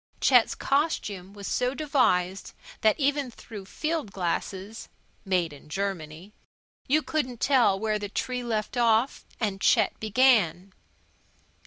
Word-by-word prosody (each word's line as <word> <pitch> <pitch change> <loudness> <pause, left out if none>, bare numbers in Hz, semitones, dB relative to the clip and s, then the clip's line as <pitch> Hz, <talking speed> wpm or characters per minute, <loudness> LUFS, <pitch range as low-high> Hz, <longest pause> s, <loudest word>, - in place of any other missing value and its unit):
Chet's 250 -4 +4
costume 210 - -1
was 200 0 -10
so 250 +5 0
devised 195 - +1 0.3
that 220 +5 +3
even 285 -1 +1
through 220 -4 -10
field 310 +1 -3
glasses 190 +3 -4 0.4
(made 180 -5 0
in 145 +1 -15
Germany) 185 0 -4 0.5
you 305 +3 +3
couldn't 255 -7 -2
tell 245 -8 +3
where 215 0 0
tree 245 +5 -3
left 230 0 -3
off 235 +2 +2
and 200 -4 -2
Chet 220 -4 +3
began. 210 -6 +2
215 Hz, 120 wpm, -27 LUFS, 195-255 Hz, 0.5 s, Chet's